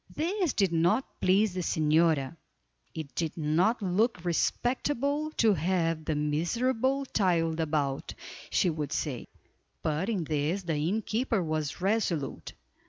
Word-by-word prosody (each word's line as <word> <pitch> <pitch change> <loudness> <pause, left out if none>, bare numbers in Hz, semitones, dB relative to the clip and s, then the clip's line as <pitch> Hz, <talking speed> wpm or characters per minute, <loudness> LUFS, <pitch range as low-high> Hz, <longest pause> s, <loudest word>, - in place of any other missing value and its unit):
This 350 - 0
did 195 -4 +1
not 175 +10 +1
please 195 +2 +3
the 185 - -3
señora. 160 -3 +2 0.6
It 155 -3 -6
did 165 -1 -3
not 170 +9 +1
look 190 0 +1
respectable 280 - 0
to 220 -3 +5
have 165 -2 0
the 155 - 0
miserable 235 - 0
child 170 -8 +1
about, 150 -4 -1 0.3
she 180 - +2
would 150 -2 -4
say; 135 -6 -3 0.6
but 155 +6 -1
in 200 -7 0
this 155 +5 -1
the 170 -2 -2
innkeeper 215 - 0
was 155 -1 -3
resolute. 190 - -1
175 Hz, 125 wpm, -29 LUFS, 155-220 Hz, 0.6 s, to